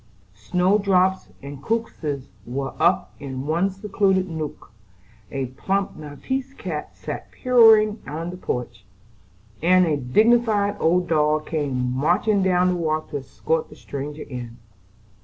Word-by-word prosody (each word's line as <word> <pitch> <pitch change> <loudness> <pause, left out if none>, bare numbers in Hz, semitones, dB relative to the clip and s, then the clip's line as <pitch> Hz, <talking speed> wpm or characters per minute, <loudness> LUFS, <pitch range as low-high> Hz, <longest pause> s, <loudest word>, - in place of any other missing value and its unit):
Snow 180 - +1
drops 190 -1 +2
and 140 -1 -8
crocuses 155 - -3 0.2
were 135 +4 -4
up 180 +1 +2
in 135 -1 -5
one 170 +6 +1
secluded 195 -1 0
nook; 160 -8 -6 0.6
a 135 -1 -2
plump 190 +10 -2
maltese 260 - -5
cat 160 - -6
sat - - -6
purring 225 -4 +5
in 165 +3 -4
the 180 - -8
porch; 120 - -4 0.8
and 185 +2 +5
a 155 -3 +1
dignified 210 - +3
old 175 +2 +2
dog 155 -1 +2
came 130 -5 -1
marching 180 +9 +2
down 180 -1 +3
the 180 - +1
walk 155 -2 -2
to 145 - -2
escort 145 +4 -2
the - - -13
stranger 145 +2 -6
in. 120 -3 -8
165 Hz, 135 wpm, -23 LUFS, 140-195 Hz, 0.8 s, purring